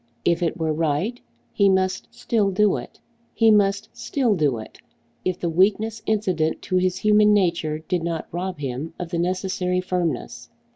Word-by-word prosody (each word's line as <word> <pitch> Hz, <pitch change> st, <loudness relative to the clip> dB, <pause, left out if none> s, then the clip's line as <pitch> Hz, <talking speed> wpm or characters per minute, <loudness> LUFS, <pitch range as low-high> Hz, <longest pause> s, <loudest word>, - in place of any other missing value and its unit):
If 170 Hz, 0 st, +2 dB
it 170 Hz, -, 0 dB
were 160 Hz, -1 st, 0 dB
right, 165 Hz, +10 st, -1 dB, 0.3 s
he 200 Hz, -1 st, +4 dB
must 185 Hz, -1 st, +1 dB
still 215 Hz, -4 st, 0 dB
do 200 Hz, +1 st, +3 dB
it. -, -, -10 dB, 0.4 s
He 225 Hz, -1 st, +5 dB
must 200 Hz, -1 st, +2 dB
still 235 Hz, 0 st, 0 dB
do 145 Hz, -8 st, +1 dB
it, 110 Hz, -, -10 dB, 0.4 s
if 185 Hz, -1 st, -1 dB
the 175 Hz, -, -2 dB
weakness 210 Hz, +6 st, +1 dB
incident 185 Hz, -7 st, 0 dB
to 185 Hz, -, 0 dB
his 185 Hz, 0 st, +1 dB
human 210 Hz, +1 st, +4 dB
nature 170 Hz, -5 st, +1 dB
did 170 Hz, +2 st, -2 dB
not 165 Hz, -1 st, -3 dB
rob 180 Hz, +1 st, -4 dB
him 140 Hz, +2 st, -5 dB
of 175 Hz, -2 st, -5 dB
the 170 Hz, -1 st, -2 dB
necessary 180 Hz, 0 st, -1 dB
firmness. 180 Hz, -7 st, -3 dB
185 Hz, 165 wpm, -23 LUFS, 165-205 Hz, 0.4 s, He